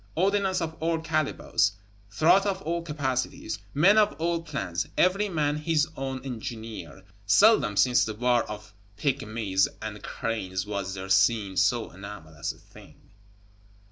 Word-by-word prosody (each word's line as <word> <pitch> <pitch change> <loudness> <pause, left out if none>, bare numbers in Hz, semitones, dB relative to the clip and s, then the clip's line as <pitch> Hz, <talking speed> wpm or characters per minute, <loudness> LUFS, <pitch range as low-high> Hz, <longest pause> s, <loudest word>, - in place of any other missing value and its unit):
Ordnance 195 +1 +1
of 160 -1 -3
all 165 +1 0
calibres; 155 -9 0 0.4
throats 175 - +4
of 195 -1 -2
all 170 +1 -1
capacities; 140 -6 -3 0.2
men 195 +9 +6
of 210 - +3
all 170 +1 0
plans, 95 - -3
every 195 +3 +3
man 150 -4 0
his 155 -1 +1
own 135 -1 -5
engineer; 115 -5 -7 0.2
seldom 150 - +5
since 120 +5 +4
the 110 - -4
war 120 +1 +2
of 105 0 -8 0.2
Pygmies 110 -8 0
and 110 -1 -6
Cranes 95 -5 -3
was 100 -2 -4
there 95 0 -6
seen 100 0 +3
so 100 +6 +1
anomalous 90 -5 -7
a - - -16
thing. - - -18
125 Hz, 140 wpm, -27 LUFS, 105-165 Hz, 0.4 s, men